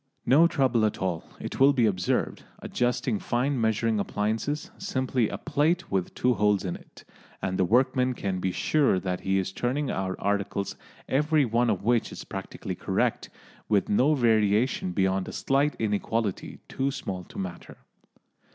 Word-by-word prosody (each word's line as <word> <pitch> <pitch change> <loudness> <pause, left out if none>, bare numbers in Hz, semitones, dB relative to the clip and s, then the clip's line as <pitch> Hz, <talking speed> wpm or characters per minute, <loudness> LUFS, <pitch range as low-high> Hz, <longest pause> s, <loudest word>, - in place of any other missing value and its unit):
No 160 +6 +6
trouble 130 -8 +2
at 110 - +1
all, 90 -4 -2 0.2
it - - -6
will 140 +2 +6
be 125 -4 +3
observed, 95 -4 0 0.2
adjusting 120 -3 -1
fine 125 +1 0
measuring 110 0 +1
appliances, 110 +9 -2
simply 130 - 0
a - - -4
plate 165 +4 0
with 95 -2 -1
two 125 0 +2
holes 105 -3 +2
in 90 - -2
it, - - -15 0.4
and 95 - -2
the 95 - +2
workman 125 +3 +2
can 95 -4 -2
be 95 0 -1
sure 140 -3 +2
that 90 -1 -3
he 95 0 0
is 95 0 -1
turning 130 +7 -1
out 95 0 -2
articles 100 0 -1 0.3
every 150 +1 +2
one 120 +1 +1
of - - -1
which 120 +1 +1
is - - -8
practically - - -6
correct, - - -1 0.4
with 105 -3 +2
no 135 +9 +3
variation 110 -3 +2
beyond 95 0 0
a - - -5
slight 140 +2 +1
inequality 105 -1 -2
too 135 +1 -1
small 100 -10 -5
to - - -13
matter. 90 -3 -6
115 Hz, 160 wpm, -27 LUFS, 100-130 Hz, 0.4 s, No